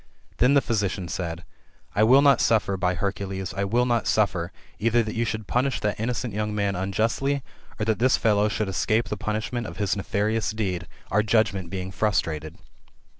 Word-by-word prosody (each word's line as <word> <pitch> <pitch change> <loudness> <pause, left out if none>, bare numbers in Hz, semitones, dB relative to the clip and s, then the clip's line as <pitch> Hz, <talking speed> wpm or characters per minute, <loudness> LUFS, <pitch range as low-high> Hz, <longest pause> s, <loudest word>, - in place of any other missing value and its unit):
Then 130 +4 +4
the 140 - +6
physician 100 -5 -1
said, 85 -1 -4 0.3
'* - - -34
I 105 - +2
wiH 130 +6 +6
not 140 -3 +5
suffer, 105 -3 +2
by 90 -1 0
Hercules, 95 0 -3
I 100 0 0
will 120 +5 +2
hot 120 -3 0
suffer, 95 -5 +1 0.3
either 115 +2 +3
that 110 - -5
you 115 +1 0
should 110 -2 -4
pooiah 130 +2 0
that 105 -1 -1
innocent 115 -1 -2
young 105 0 -2
man 100 -1 0
unjustly, 115 +9 0 0.4
or 110 - 0
that 110 -1 0
this 130 +2 +4
fellow 105 -1 +2
should 105 0 -1
escape 110 +4 0
the - - -2
punishment 110 +2 -3
of - - -9
his 100 -2 0
nefarious 105 +2 -1
deed, 90 -5 -2 0.2
our 105 - +4
judgment 100 -4 +1
being 95 0 -4
frustrated. 80 -6 -1
105 Hz, 185 wpm, -25 LUFS, 95-115 Hz, 0.4 s, the